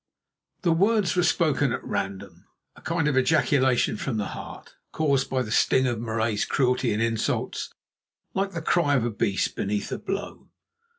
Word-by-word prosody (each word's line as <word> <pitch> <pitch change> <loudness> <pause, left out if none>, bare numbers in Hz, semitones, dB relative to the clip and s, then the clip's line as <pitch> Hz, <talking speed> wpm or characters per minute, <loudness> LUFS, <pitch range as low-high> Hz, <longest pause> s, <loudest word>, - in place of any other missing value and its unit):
'" - - -53
The 175 - +3
words 200 +3 +2
were 180 - +3
spoken 150 -6 +2
at - - -3
random, 95 -3 -5 0.3
a - - -16
kind 165 -2 0
of 150 - +1
ejaculation 130 -4 +2
from 125 -1 -3
the 105 - -2
heart, - - -9 0.2
caused 140 -4 +1
by 130 -1 0
the 110 - -7
sting 130 +3 +3
of 120 -3 -1
Marais's 110 -2 -1
cruelty 125 -2 +1
and 105 +2 0
insults, 115 -1 -2 0.6
like 195 +1 -1
the 165 -1 -4
cry 150 -4 +2
of 120 -4 +1
a 120 - -1
beast 100 -2 -1
beneath 100 0 -2
a - - -3
blow. 195 +1 -5
130 Hz, 175 wpm, -25 LUFS, 110-160 Hz, 0.6 s, The